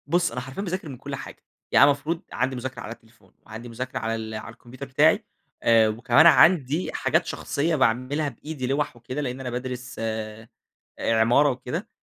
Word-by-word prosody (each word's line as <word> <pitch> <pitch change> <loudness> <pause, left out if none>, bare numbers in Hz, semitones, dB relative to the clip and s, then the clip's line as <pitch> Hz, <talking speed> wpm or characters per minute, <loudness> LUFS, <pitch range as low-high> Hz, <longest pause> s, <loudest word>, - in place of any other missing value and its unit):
بُصّ، 175 +3 +2
أنا 125 +2 -4
حرفيًا 130 +8 -6
باذاكر 185 -4 -4
من 130 - -8
كل - - -6
حاجة. - - -10 0.3
يعني - - +7
أنا 145 - +7
المفروض 150 +4 -3
عندي 130 +3 -1
مذاكرة 125 -1 -6
على 105 - -7
التليفون، 115 -1 -24
وعندي 115 +2 -9
مذاكرة 125 +3 -5
على 115 0 -2
ال 110 -1 -6
على 110 +1 -7
الكمبيوتر 120 +4 -10
بتاعي 145 +4 +3 0.4
آآ، 115 -1 +5
وكمان 120 +7 +4
عندي 160 -2 +4
حاجات - - +1
شخصية 155 +3 -1
باعملها 130 +3 +1
بإيدي 140 +1 -6
لوّح 140 0 -1
وكده، 125 +4 -5
لإن 130 -2 -4
أنا 130 -2 -4
بادرس 125 0 -5
آآ، 110 0 -4 0.5
عمارة 115 +6 +3
وكده. 130 -2 -4
125 Hz, 180 wpm, -25 LUFS, 115-145 Hz, 0.5 s, يعني